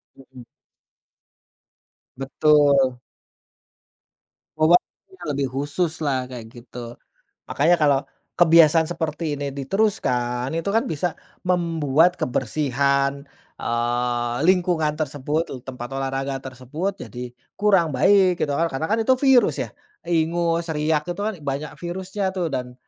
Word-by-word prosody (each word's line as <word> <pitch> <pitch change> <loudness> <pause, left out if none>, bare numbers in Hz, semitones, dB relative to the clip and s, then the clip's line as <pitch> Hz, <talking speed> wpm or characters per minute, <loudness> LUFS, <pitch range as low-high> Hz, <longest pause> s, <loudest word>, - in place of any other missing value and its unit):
Mhm. 130 -2 -14 1.7
Betul. 140 -1 +3 1.6
Obatnya 175 +3 +1
lebih 140 -1 -1
khususlah 145 -2 -2
kayak 125 -3 -8
gitu. 120 -1 -10 0.5
Makanya 160 +5 +3
kalau 145 -3 +4 0.4
kebiasaan 165 -1 +6
seperti 160 -2 -3
ini 140 -1 -4
diteruskan 130 - -1
itu 165 +4 -2
kan 225 +2 +2
bisa 165 +2 -1 0.4
membuat 170 -2 +2
kebersihan, 140 +2 0 0.3
eee, 120 0 -1
lingkungan 175 -4 +2
tersebut 150 +1 -2
tu - - -5
tempat 125 -1 -7
olahraga 135 0 -2
tersebut 135 +9 -5
jadi 120 +3 -7 0.3
kurang 195 -6 +3
baik 185 +6 +4
gitu 145 - 0
kan, 165 - +2
karena 155 +4 -2
kan 220 - +1
itu 260 +3 +4
virus 265 -3 +4
ya. - - -6 0.4
Ingus, 170 0 +1
riak 150 0 +1
itu 175 +3 -4
kan 220 +1 -1
banyak 145 +1 -4
virusnya 190 +2 -3
tuh 180 -3 -1
dan 125 -2 -4
150 Hz, 115 wpm, -23 LUFS, 130-175 Hz, 1.7 s, kebiasaan